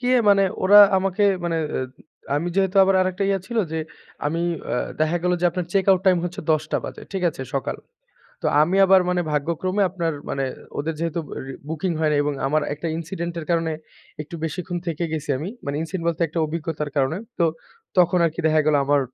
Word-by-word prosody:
কি 250 - -1
অ্যা 245 - +4
মানে 195 -1 +5 0.2
ওরা 205 +2 +9 0.2
আমাকে 195 +2 +1 0.2
মানে 165 -1 0 0.2
অ্যা 130 - -1 0.5
আমি 170 +4 -1
যেহেতু 190 0 +1
আবার 195 - +3
আরেকটা 185 +1 0
ইয়া 195 - +2
ছিল 235 -1 -2
যে 160 - -1 0.5
আমি 165 +3 -1 0.3
আ - - +1 0.3
দেখা 155 +2 +2
গেল 180 0 +2
যে - - 0
আপনার 180 0 -3
চেক 195 -2 +2
আউট 185 - +4
টাইম 180 -2 +5
হচ্ছে 175 0 -4
১০ 155 0 +1
টা - - +2
বাজে। - - -7
ঠিক 190 - -2
আছে? 135 - -7
সকাল 135 - -2 0.7
তো - - 0 0.2
আমি 180 +5 +1
আবার 190 0 +6
মানে 180 0 +1
ভাগ্যক্রমে 170 +7 0
আপনার 170 -3 -2 0.2
মানে 135 - -1 0.3
ওদের 160 +3 -2
যেহেতু 165 0 -1 0.3
রি 135 - -6 0.2
বুকিং 165 +3 -2
হয় 155 -1 +2
নাই 145 - +2
এবং 145 -1 -1
আমার 155 +2 +1
একটা 155 +3 -6
incident 170 +1 -4
এর 160 - -6
কারণে 165 -1 +1 0.5
একটু 155 +3 -11
বেশিক্ষণ 175 +2 -4
থেকে 170 0 -2
গেছি 150 -2 -3
আমি। 160 +7 -4 0.2
মানে 140 +1 -3
ইনসিন 175 +3 -4
বলতে 170 0 -1
একটা 165 - -4
অভিজ্ঞতার 155 -1 -4
কারণে। 140 +3 +1 0.2
তো 170 - +4 0.5
তখন 180 0 +4
আরকি 165 +2 -3
দেখা 155 0 +4
গেল 155 - +3
আমার 145 0 +3
170 Hz, 205 wpm, -23 LUFS, 155-185 Hz, 0.7 s, ওরা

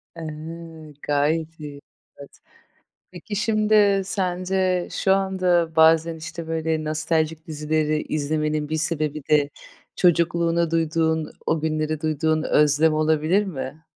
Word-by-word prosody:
E! 165 - -8 0.9
Gayet 155 +3 0
iyi. 145 -2 -8 0.4
Evet. 140 - -14 0.7
Peki, 185 +3 -7
şimdi 210 -2 +3
sence 185 -1 -1
şu 190 - +2
anda 180 -4 +1
bazen, 160 +1 +4
işte, 160 +1 -8
böyle, 160 -1 -1
nostaljik 155 +1 -1
dizileri 155 0 -1
izlemenin 150 0 -2
bir 155 - -1
sebebi 155 -1 -2
de 145 -2 +3 0.5
çocukluğuna 170 -1 +2
duyduğun, 160 -1 0
o 160 - +1
günlere 155 0 -2
duyduğun 155 0 0
özlem 150 +1 +3
olabilir 155 +5 +2
mi? 155 -3 -6
160 Hz, 110 wpm, -23 LUFS, 155-175 Hz, 0.9 s, bazen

